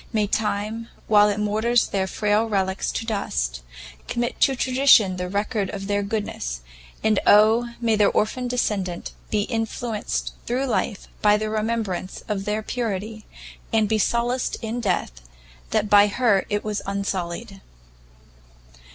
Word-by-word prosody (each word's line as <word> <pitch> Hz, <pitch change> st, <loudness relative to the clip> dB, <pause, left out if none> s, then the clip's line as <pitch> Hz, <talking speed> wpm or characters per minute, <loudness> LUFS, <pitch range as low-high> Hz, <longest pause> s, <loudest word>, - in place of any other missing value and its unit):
may 215 Hz, -3 st, +1 dB
time, 215 Hz, +2 st, -2 dB, 0.2 s
while 210 Hz, -1 st, +5 dB
it 205 Hz, 0 st, -1 dB
moulders 220 Hz, +3 st, +2 dB
their 190 Hz, -1 st, -1 dB
frail 210 Hz, +3 st, +1 dB
relicks 190 Hz, -2 st, 0 dB
to 225 Hz, -, -3 dB
dust, 60 Hz, -, -2 dB, 0.5 s
commit 240 Hz, 0 st, -2 dB
to 270 Hz, -, +4 dB
tradition 255 Hz, -7 st, +4 dB
the 180 Hz, 0 st, -3 dB
record 205 Hz, +1 st, -1 dB
of 195 Hz, -1 st, -5 dB
their 205 Hz, 0 st, 0 dB
goodness; 200 Hz, -, -3 dB, 0.4 s
and 215 Hz, -2 st, +3 dB
Oh, 225 Hz, +3 st, +5 dB
may 230 Hz, -2 st, +2 dB
their 205 Hz, -1 st, +4 dB
orphan 250 Hz, +4 st, 0 dB
descendant 200 Hz, -8 st, -2 dB, 0.2 s
be 210 Hz, -1 st, +1 dB
influenced 225 Hz, -1 st, -3 dB
through 255 Hz, +3 st, 0 dB
life 230 Hz, -4 st, -2 dB
by 210 Hz, 0 st, +5 dB
the 215 Hz, 0 st, -3 dB
remembrance 215 Hz, -4 st, -2 dB
of 195 Hz, -2 st, -2 dB
their 210 Hz, +1 st, -1 dB
purity, 215 Hz, -2 st, -4 dB, 0.4 s
and 220 Hz, -1 st, +3 dB
be 220 Hz, +1 st, +1 dB
solaced 240 Hz, +4 st, 0 dB
in 225 Hz, +2 st, -3 dB
death, 185 Hz, -, 0 dB, 0.6 s
that 215 Hz, -1 st, +1 dB
by 205 Hz, 0 st, +6 dB
her 210 Hz, -3 st, +2 dB
it 205 Hz, 0 st, -1 dB
was 210 Hz, -1 st, -2 dB
unsullied!" 195 Hz, +1 st, -3 dB
210 Hz, 145 wpm, -23 LUFS, 200-225 Hz, 0.6 s, by